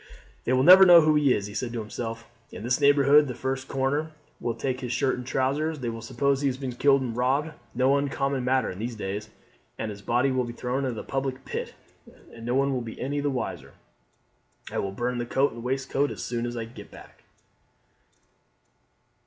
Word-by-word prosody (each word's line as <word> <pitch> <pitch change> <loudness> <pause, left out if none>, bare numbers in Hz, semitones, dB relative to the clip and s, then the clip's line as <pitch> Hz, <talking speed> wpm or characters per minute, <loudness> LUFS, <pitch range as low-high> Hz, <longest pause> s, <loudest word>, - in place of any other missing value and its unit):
"They 125 - +1
will 130 0 +3
never 185 +5 +10
know 175 -2 +9
who 155 0 +3
he 150 -3 +3
is," 100 - +1
he 105 - -8
said 120 +2 -3
to 120 - -3
himself 115 +1 -6 0.2
"In - - -8
this 125 +2 0
neighbourhood 145 +1 +5
the 125 - -5
first 130 +1 -3
comer 140 +4 -1 0.3
will 120 -1 -2
take 130 +2 -2
his 125 -2 -4
shirt 130 +2 +1
and 125 - -6
trousers. 145 +5 0
They 120 -2 -3
will 115 0 -6
suppose 140 +4 0
he 140 - +1
has 130 -1 -1
been 135 -2 -4
killed 135 +2 +3
and 120 -3 -4
robbed, 135 +6 +1 0.2
no 130 +3 +3
uncommon 140 -1 -1
matter 130 0 +1
in 90 - -9
these 115 +2 -4
days, 105 0 -5 0.5
and 110 - -3
his 100 -1 -10
body 120 +6 +1
will 130 -1 +1
be 120 -1 -6
thrown 125 +3 -2
into 125 -3 -2
the - - -6
public 135 -1 -3
pit, - - -5 0.6
and 115 0 -9
no 120 - 0
one 135 -1 +1
be 115 -1 -8
any 145 +3 -2
the 145 0 0
wiser. 130 -3 -4 1.0
I - - -2
will 100 - -2
burn 120 +4 -2
the 120 - -2
coat 135 +3 +2
and 115 - -8
waistcoat 135 +2 -1
as - - -6
soon 120 0 -2
as 120 0 -5
I 115 - -3
get 115 - -12
back." - - -15
130 Hz, 210 wpm, -26 LUFS, 120-140 Hz, 1.0 s, never